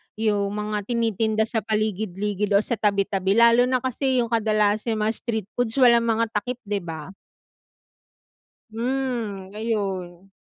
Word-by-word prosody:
yung 205 -2 0
mga 210 -1 -3
tinitinda 225 -1 0
sa 225 - 0
paligid-ligid 210 -1 -1
o 200 - +5
sa 235 +2 -3
tabi-tabi 195 -2 +1
lalo 235 +1 +6
na 255 0 +1
kasi 260 0 0
yung 235 - -2
kadalasang 215 0 +1
mga 215 +1 +1
street 220 -5 -3
foods 245 -2 0
walang 235 -2 +6
mga 230 0 +1
takip, 245 +4 -3
'di 205 -1 -2
ba? 160 -2 -6 1.6
Mm, 230 -5 -3
ayun. 195 -4 -3
215 Hz, 130 wpm, -24 LUFS, 200-235 Hz, 1.6 s, lalo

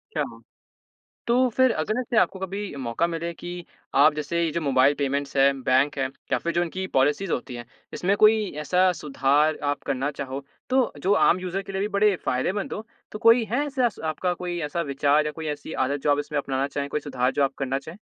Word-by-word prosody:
अच्छा। - - +1 1.0
तो 235 - +3 0.2
फ़िर 260 +1 +3
अगर 215 +10 -1
ऐसे 240 -2 -2
आपको 190 -2 +2
कभी 190 -2 -5
मौका 130 +4 -1
मिले 170 0 -3
कि 175 0 -8 0.3
आप 145 +2 +6
जैसे 150 +3 -1
ये 165 - +1
जो 170 - -2
मोबाइल 135 -1 +4
पेमेंट्स 140 0 -1
है, 135 +1 +6
बैंक 135 +3 +2
है 135 - 0 0.2
या - - +3
फिर 170 - -3
जो 175 - +2
उनकी 185 +2 -3
पॉलिसीज़ 150 +7 +2
होती 125 0 -3
है, 120 0 -7 0.3
इसमें 195 +3 +1
कोई 215 -2 +5
ऐसा 180 +5 +3
सुधार 150 +1 +2
आप 145 - -4
करना 135 +2 -1
चाहो, 135 0 -6 0.3
तो 260 -2 +2
जो 195 +7 +2
आम 180 - +4
यूज़र 185 +1 -3
के 195 - -9
लिए 200 +2 0
बड़े 205 0 +3
फ़ायदेमंद 185 +11 -1
हो? 215 - -6 0.3
तो 210 - -6
कोई 230 +1 +6
है 280 +5 +1
ऐसे 265 -4 +1
स - - -17
आपका 180 +3 -1
कोई 175 0 -4
ऐसा 170 +3 -2
विचार 145 +2 +2
या 150 - -1
कोई 160 0 -7
ऐसी 150 - -9
आदत 140 +2 -2
जो 145 - +3
आप 145 - +2
इसमें 145 0 -2
अपनाना 135 0 -1
चाहे? 140 0 -3
कोई 150 - -2
सुधार 130 -3 -1
जो 140 - +1
आप 135 - 0
करना 135 0 -1
चाहे? 160 +6 -11
155 Hz, 220 wpm, -25 LUFS, 140-195 Hz, 1.0 s, आप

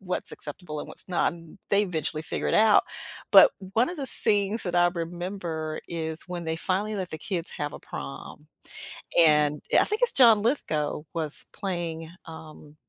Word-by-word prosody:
what's 185 -2 -2
acceptable 150 +1 -7
and - - -6
what's - - -5
not, 175 -1 +1
n 165 +2 -13
they 200 0 +4
eventually 160 -4 -2
figure - - -3
it - - 0
out. 215 0 +5 0.5
But - - +9 0.2
one 230 +3 +3
of 355 - -7
the 280 - -4
things 210 -1 +1
that 175 -2 -3
I 175 0 +5
remember 170 -2 -4
is 160 0 -4
when 175 -1 -5
they 160 0 -1
finally 200 +5 -1
let 185 -2 -3
the - - -4
kids 175 -2 -3
have 145 0 -4
a - - -8
prom. 70 0 -8 0.8
And 150 -2 +4 0.2
I - - +5
think 425 +2 -2
it's - - +4
John 230 -5 +6
Lithgow 155 - -1
was 155 -3 -2
playing, 170 -4 -4 0.2
um, 155 -2 -12
175 Hz, 175 wpm, -26 LUFS, 155-200 Hz, 0.8 s, But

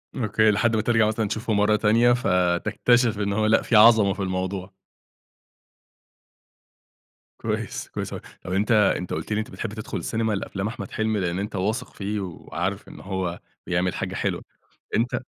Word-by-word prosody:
أوكي 110 -2 +2
لحد 110 +3 +2
ما 110 - +2
ترجع 110 -1 +3
مثلًا 110 0 0
تشوفه 110 +2 -2
مرّة 105 +1 +3
تانية، 115 +3 +4
فتكتشف 105 +3 +2
إن 100 -1 0
هو 110 +1 +1
لأ، 110 +1 +4
في 115 - 0
عظمة 105 -2 +7
في - - -11
الموضوع. 95 0 -3 2.7
كويس، - - -3
كويس - - -5
أوي. - - -6 0.2
طب 90 - -4
أنتَ 105 +5 +1
أنتَ 100 -5 +2
قُلت - - -4
لي - - +1
إن - - 0
أنتَ 110 - -5
بتحب 110 -3 -5
تدخل 110 -1 -5
السينيما 110 -1 -1
لأفلام 95 0 -3
أحمد 110 - -6
حلمي، 110 -1 0
لأن 90 -1 -1
أنتَ 105 +1 -4
واثق 105 +4 -2
فيه 105 +1 -3
وعارف 95 +1 -4
إن - - -11
هو 95 -3 -3 0.3
بيعمل 90 0 0
حاجة - - -4
حلوة - - -2 0.5
أنتَ 120 +2 0
105 Hz, 170 wpm, -24 LUFS, 95-110 Hz, 2.7 s, عظمة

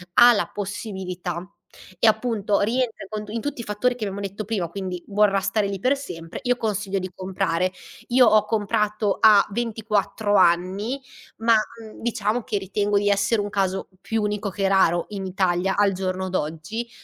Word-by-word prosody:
ha 240 0 +9
la 205 - 0
possibilità 185 -4 -5 0.5
e 225 - +4
appunto 215 -2 +1
rientra 230 0 -1
con 215 -1 -5
tu 210 - -10
in 230 +1 -3
tutti 285 -3 -4
i - - -7
fattori 215 +4 0
che 240 - -6
abbiamo 200 0 -4
detto 200 +2 -4
prima, 200 -6 -1
quindi 185 -1 -5
vorrà 205 -1 +3
stare 205 +1 0
lì 195 -1 -4
per 255 +8 +2
sempre, 165 -10 -7
io 250 -1 +1
consiglio 205 -3 -2
di 185 0 -5
comprare. 185 -1 -1 0.4
Io 250 +1 +6
ho 215 -1 +5
comprato 210 -1 0
a 210 -2 +7
24 210 -2 -1
anni 190 +8 +2 0.4
ma, 230 +1 +3
mhmm, 220 0 -4
diciamo 225 0 0
che 210 - -2
ritengo 200 +1 0
di 205 0 +2
essere 205 +2 +2
un 205 - -3
caso 190 -1 -1
più 220 -1 -1
unico 210 0 -1
che 195 +1 -1
raro 175 -3 +3
in 195 -2 -5
Italia 185 0 +1
al 205 -1 +4
giorno 185 0 -2
d'oggi. 175 +8 -3
205 Hz, 175 wpm, -23 LUFS, 190-220 Hz, 0.5 s, ha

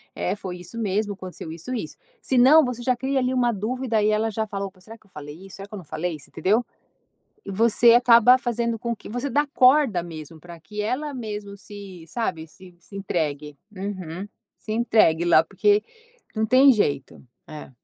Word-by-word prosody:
é - - -2
foi 185 -3 -7
isso 180 +6 -10
mesmo, 205 0 -1
aconteceu 185 -4 -9
isso 170 +10 -6
isso. 245 - -5 0.2
Se 260 - 0
não 290 +6 +7
você 250 -1 -4
já 255 +1 +2
cria 270 +3 -2
ali 255 0 0
uma 245 -2 +2
dúvida 225 +2 -1
e 210 - +2
ela 215 +1 +1
já 220 +1 -2
fala, 200 -1 -4
opa 190 -1 -16
será 220 +5 -11
que 220 - -29
eu - - -30
falei 145 -1 -9
isso, 190 - -10
será 195 0 -9
que 210 - -18
eu - - -5
não 190 - -9
falei? 155 +2 -4
Você - - -13
entendeu? 205 +9 +1 0.8
Você 230 +4 +4
acaba 245 0 +6
fazendo 235 -2 -2
com 235 0 -3
que - - -16
você 245 +5 -3
dá 290 +4 +1
corda 255 - +4
mesmo 160 -2 -10
pra 170 +1 -12
que 210 +7 -7
ela 285 +7 -2
mesmo 210 -4 -6
se, 195 -4 -11
sabe, 165 -7 -3
se 180 +2 -17
se 200 - -13
entregue. 150 -6 -3 0.2
Uhum, 190 -2 -6 0.3
se 215 - -7
entregue 215 -8 +3
lá, 165 -2 +5
porque 205 +3 +2 0.5
não 220 - +1
tem 260 +4 +6
jeito. 145 - -1 0.3
É. 155 -2 -9
210 Hz, 200 wpm, -23 LUFS, 180-240 Hz, 0.8 s, não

